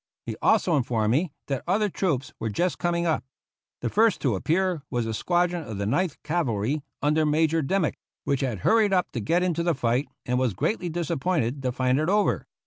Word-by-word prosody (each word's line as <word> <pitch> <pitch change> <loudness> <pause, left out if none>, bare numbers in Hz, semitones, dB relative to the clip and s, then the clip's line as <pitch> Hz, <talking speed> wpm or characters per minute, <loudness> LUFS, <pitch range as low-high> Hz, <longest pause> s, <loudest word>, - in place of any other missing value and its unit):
He - - -4
also 185 -7 +3
informed 115 -4 +1
me 155 +6 +1
that 135 -3 -3
other 210 +4 +2
troops 160 -9 -1
were 115 - -2
just 175 - -1
coming 170 0 0
up. 160 -2 +1 0.6
The - - -1
first 220 0 +3
to 130 -5 +1
appear 170 - 0
was 120 -3 -1
a 115 - -2
squadron 175 +7 +1
of 110 -6 -6
the 100 - -2
Ninth 155 - 0
Cavalry, 150 -4 0 0.2
under 150 +2 +3
Major 160 +1 +2
Dimick, 165 +3 0 0.2
which 140 -2 0
had 120 -8 -2
hurried 215 - +3
up 180 -1 +1
to 120 - -3
get 170 - +1
into 170 -2 0
the 170 -1 +1
fight, 125 +1 0 0.2
and 125 0 0
was 125 -7 0
greatly 180 - -1
disappointed 155 -5 -1
to 130 -1 -1
find 130 +2 +1
it 155 +3 0
over. 205 +1 +1
155 Hz, 200 wpm, -26 LUFS, 125-175 Hz, 0.6 s, also